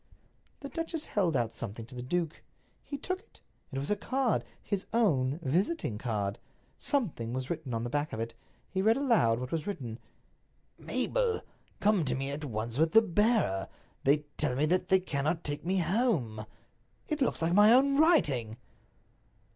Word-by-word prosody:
The 280 - -6
duchess 330 -1 -3
held 175 -8 +1
out 115 -2 -1
something 115 0 -6
to 130 - -14
the 125 - -5
duke. 165 +5 -2 0.4
He 285 - -6
took 370 +6 -3
it. 450 - -23 0.3
It 135 - -4
was 140 +6 -2
a - - +4
card—his 225 -4 -2
own 150 - +2
visiting 170 - 0
card. 105 -4 -2 0.4
Something 170 - 0
was 130 +2 -3
written 155 -6 -4
on 115 -1 -1
the 120 - -3
back 145 +1 -1
of 110 - -4
it. 115 0 -3 0.3
He 190 - -1
read 220 +4 +4
aloud 230 - +3
what 125 0 -5
was 160 0 -2
written. 125 - -5 0.8
"Mabel, - - 0 0.4
come 205 -4 +3
to 125 -2 0
me 135 +1 -3
at 145 +2 -5
once 115 0 -3
with 160 0 +3
the 225 - +8
bearer. 210 - +2 0.4
They 145 +2 +3
tell 140 -5 0
me 145 +4 +2
that 180 +4 +1
they 190 - +6
cannot 160 -1 -1
take 145 0 -3
me 185 +3 0
home." 165 - 0 0.6
It 305 -1 -2
looks 260 - +1
like 165 +1 +1
my 210 +3 +7
own 275 +3 +5
writing." 140 - +3
160 Hz, 170 wpm, -30 LUFS, -, 0.8 s, the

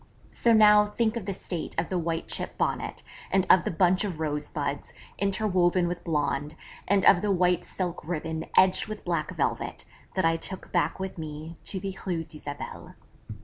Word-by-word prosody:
So 235 - +2
now, 210 -1 +7
think 220 +1 0
of 220 -5 -5
the - - 0
state 175 -2 -5
of 165 0 0
the 185 - 0
white 165 -1 -2
chip - - -4
Bonnet, - - -2 0.3
and 190 -1 +2
of 185 - +6
the - - +1
bunch 180 +3 +3
of 185 -6 -4
rosebuds, 150 -2 -3 0.3
interwoven 185 -3 +2
with 175 0 -4
blonde, 150 -2 -1 0.3
and 195 0 +3
of 175 - +7
the 210 - 0
white 180 -2 +2
silk 180 -2 -4
ribbon 160 -1 -3
edged 185 0 +5
with 215 -1 -7
black - - -1
velvet, - - -2 0.3
that 185 - +2
I 165 0 +3
took 185 +3 -5
back 175 +1 +1
with 190 -2 -5
me 155 +1 -7
to 190 - -3
the 195 0 -4
Rue 175 -4 -1
d'Isabelle. 150 -2 -8
180 Hz, 180 wpm, -27 LUFS, 160-195 Hz, 0.3 s, now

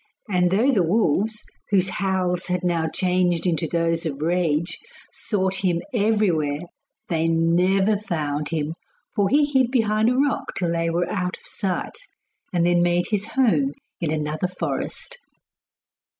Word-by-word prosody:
And 180 -3 +2
through 220 +9 +3
the 210 -8 +3
wolves, 210 +3 +1 0.3
whose 190 -2 +2
howls 185 -2 -1
had 180 -1 -1
now 170 -2 +1
changed 180 -1 +1
into 165 -2 +1
those 165 0 0
of 145 -4 -4
rage, 170 -1 0 0.3
sought 190 -3 -1
him 175 -3 +2
everywhere, 195 -10 +1 0.5
they 165 -1 0
never 180 +5 +3
found 150 -7 -3
him, 155 -1 -2 0.4
for 200 -2 +2
he 290 +2 +4
hid 265 -4 +2
behind 220 -3 +2
a 250 - +1
rock 275 -1 0
till 175 -3 0
they 165 0 0
were 170 +1 0
out 180 -2 -2
of - - -24
sight, 190 - -3 0.5
and 175 -2 +2
then 175 0 +3
made 175 0 +1
his 205 0 0
home 270 +3 +2 0.3
in 170 - -1
another 155 +2 -1
forest. - - -4
180 Hz, 150 wpm, -23 LUFS, 165-210 Hz, 0.5 s, he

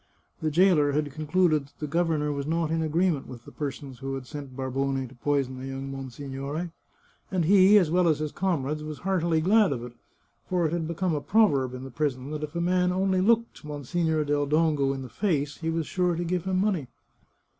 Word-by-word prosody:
The 155 - +1
jailer 155 -3 +4
had 150 0 0
concluded 155 0 +1
that - - -28
the 150 - -3
governor 155 -1 0
was 140 0 -3
not 165 0 0
in 165 0 +1
agreement 160 -1 +1
with 120 -2 -10
the - - -11
persons 135 -3 -6
who 135 0 -4
had 135 -1 -6
sent 140 -2 -8
Barbone 135 0 -1
to 125 - -15
poison 130 0 -1
the 130 - -6
young 135 0 -5
monsignore, 135 +5 -5 0.6
and 185 -5 0
he, 195 +3 +7
as 175 -6 +3
well 180 0 +3
as 155 -3 +3
his 150 -1 -3
comrades, 155 -5 -1
was 155 -1 -6
heartily 170 -4 +1
glad 205 +2 +4
of 120 -4 -3
it, 120 -1 -8 0.6
for 180 -2 +1
it 155 - 0
had 165 -2 -1
be 170 - -4
come 185 0 0
a 150 - -1
proverb 140 - +2
in 125 - -7
the 135 - -8
prison 135 0 -2
that 155 -1 -4
if 150 +1 -6
a 170 - 0
man 180 +1 +2
only 190 0 +1
looked 230 +1 +1
Mon 145 -1 -6
signore 160 +1 0
del 145 0 +1
Dongo 150 -2 +2
in 135 -1 -4
the - - -7
face 145 - -1
he 165 - -3
was 165 -1 -1
sure 180 0 0
to 175 - -2
give 175 0 -2
him 190 -1 0
money. 190 -9 0
155 Hz, 220 wpm, -27 LUFS, 140-175 Hz, 0.6 s, he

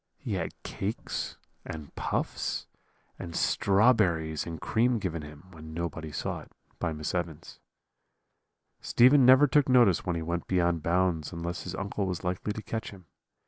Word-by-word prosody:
He - - -5
had - - -3
cakes, 100 +4 -4 0.3
and 75 -2 -8
puffs, - - -2 0.5
and 85 -2 -7
strawberries 95 -8 +2
and 80 -2 -5
cream 120 +7 +2
given 85 -6 -3
him, 75 +1 -11
when 80 -2 -10
nobody 85 -2 -4
saw - - -3
it, - - -14 0.3
by 85 - -1
Miss 75 -1 -4
Evans. 85 -4 -4 1.2
"Stephen 130 +2 +5
never 130 +3 +8
took 145 0 +3
notice 120 -8 +5
when 90 - -1
he 85 - -2
went 85 +1 -3
beyond 85 -3 +1
bounds 85 -2 +1
unless 85 0 -5
his 90 0 -5
uncle 100 +1 -2
was 90 -3 -3
likely 90 +3 -2
to 110 +1 -6
catch 115 +3 -4
him. 95 -4 -13
90 Hz, 155 wpm, -29 LUFS, 80-105 Hz, 1.2 s, never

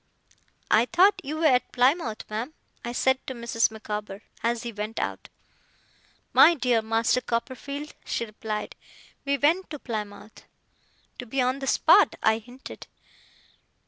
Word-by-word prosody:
'I 225 - +5
thought 360 +8 +4
you 300 +3 -4
were 320 - 0
at 255 -4 +3
Plymouth, 250 -2 +1
ma'am,' 230 +8 -5 0.3
I 240 - -4
said 260 +2 +2
to 260 - -4
Mrs. 235 -1 +1
Micawber, 210 -2 -6 0.2
as 235 0 -1
he 235 - -4
went 210 +1 -5
out. - - -4 1.0
'My 340 - +7
dear 250 -5 +1
Master 225 +2 +1
Copperfield,' 280 +5 -4
she 235 - -2
replied, 215 -1 -5 0.5
'we 280 0 +1
went 325 +7 +2
to 305 - -6
Plymouth.' 215 -4 -7 0.7
'To 250 - -5
be 270 +4 -3
on 255 +2 +1
the 270 - -5
spot,' - - +5
I 220 0 +3
hinted. 245 +4 -12
240 Hz, 145 wpm, -26 LUFS, 220-275 Hz, 1.0 s, My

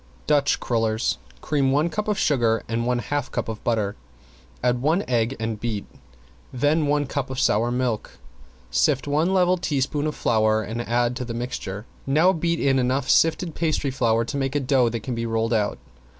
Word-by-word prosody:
~DUTCH 145 -1 +2
CRULLERS~ 115 - 0 0.2
Cream 140 -3 +1
one 150 +4 +2
cup 210 +5 -3
of 210 -2 0
sugar 115 -6 +2
and 115 +1 -1
one 125 0 +1
half 140 +2 -3
cup - - -2
of 110 -1 -6
butter, 110 -3 0 0.7
add 125 -1 +1
one 160 +8 +2
egg 120 +1 +1
and 110 -1 -3
beat, 110 -3 -3 0.7
then 145 +4 +1
one 145 0 +1
cup 135 -1 -3
of 130 -1 -4
sour 115 0 +2
milk. 125 -3 -2 0.5
Sift 130 - +2
one 155 +5 +1
level 185 -1 +3
teaspoon 145 -1 -1
of 150 - -3
flour 110 -1 +2
and 115 +3 -4
add 120 +1 0
to 130 - -3
the 115 -1 -5
mixture, 105 -4 -5 0.2
now 160 +7 +4
beat 170 0 0
in 135 -1 +2
enough 130 +2 +1
sifted 165 +1 +3
pastry 155 -4 0
flour 115 -3 +1
to 140 - -4
make 135 0 -2
a - - +3
dough 130 -3 +2
that 115 -1 -4
can 125 - -3
be 115 0 -2
rolled 115 +1 0
out. 105 -2 0
125 Hz, 190 wpm, -24 LUFS, 115-145 Hz, 0.7 s, now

